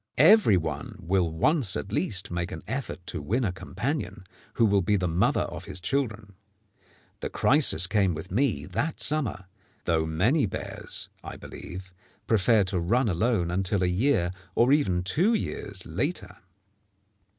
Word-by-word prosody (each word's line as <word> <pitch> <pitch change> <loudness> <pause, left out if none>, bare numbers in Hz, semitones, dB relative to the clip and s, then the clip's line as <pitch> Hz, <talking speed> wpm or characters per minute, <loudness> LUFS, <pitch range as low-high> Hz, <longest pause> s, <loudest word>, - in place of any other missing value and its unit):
Every 160 - +6
one 80 -3 -4
will 90 -2 0
once 120 - +2
at 100 - -6
least 100 -2 -1
make 85 0 -3
an - - -7
effort 130 -9 -5
to - - -2
win 120 +5 -1
a 100 - 0
companion 105 - -4 0.3
who 115 - +4
will 100 -2 +3
be 105 +3 +1
the 90 -2 0
mother 85 +2 +1
of - - -5
his - - -3
children. 110 -1 -2 0.9
The - - -4
crisis 135 - +4
came 95 -2 +1
with 80 +4 -8
me 135 +8 0
that 160 +2 -3
summer, 135 -11 -1 0.4
though 80 -2 +1
many 110 - +2
bears, - - -4 0.2
I - - -8
believe, 95 +1 -9 0.3
prefer 110 0 +3
to 95 -1 -1
run 115 +8 +1
alone 90 -1 0
until 95 +1 0
a - - +3
year, 90 0 +1 0.2
or 125 +4 +4
even 95 -12 +1
two 180 - +2
years, 100 - -4
later. 145 - -3
100 Hz, 155 wpm, -27 LUFS, 90-130 Hz, 0.9 s, Every